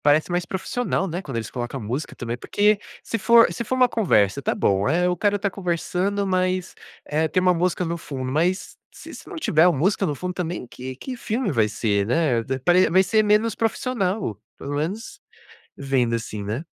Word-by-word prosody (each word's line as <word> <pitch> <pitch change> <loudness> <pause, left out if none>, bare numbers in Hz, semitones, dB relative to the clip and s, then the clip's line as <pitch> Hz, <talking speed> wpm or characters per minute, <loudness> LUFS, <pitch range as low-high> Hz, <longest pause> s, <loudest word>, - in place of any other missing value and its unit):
Parece 150 +4 +3
mais 175 0 0
profissional, 195 0 -2
né, 175 +1 -4
quando 135 -9 -5
eles 110 -2 -4
coloca 120 +1 -4
a - - -5
música 125 +7 -4
também, 120 0 -4
porque 205 - +2 0.2
se 230 - -3
for 230 +2 +6
se 235 - -4
for 255 - -2
uma 255 -1 +5
conversa, 140 - +2
está 140 - -1
bom, 100 +4 +1
eh, 175 +4 +2
o 180 - +1
cara 205 +2 +1
está 200 0 -1
conversando, 190 +2 -1
mas, 185 -1 0 0.3
eh, 155 +2 0
tem 155 - +1
uma 180 0 +4
música 180 +1 0
no 170 +1 -2
fundo, 130 -4 -5
mas 175 +6 0 0.2
se - - -12
isso - - -11
não 390 - -7
tiver 175 - +3
o 180 - +4
música 190 +7 +1
no 150 - -2
fundo 180 +5 -4
também, 175 -5 -4
que 130 +1 -8
que 255 - -6
filme 230 -1 -2
vai 115 -6 +2
ser, 100 -2 0
né, 125 -3 +2
d 130 +3 -2
pare 175 +7 +4
vai 190 +2 +5
ser 220 +3 +3
menos 210 +2 +3
profissional. 220 - -1 0.2
Pelo 145 +1 -5
menos 185 +11 -4 0.6
vendo, 130 -4 0
assim, 110 -2 -4
né. 110 +9 -4
175 Hz, 205 wpm, -23 LUFS, 130-200 Hz, 0.6 s, for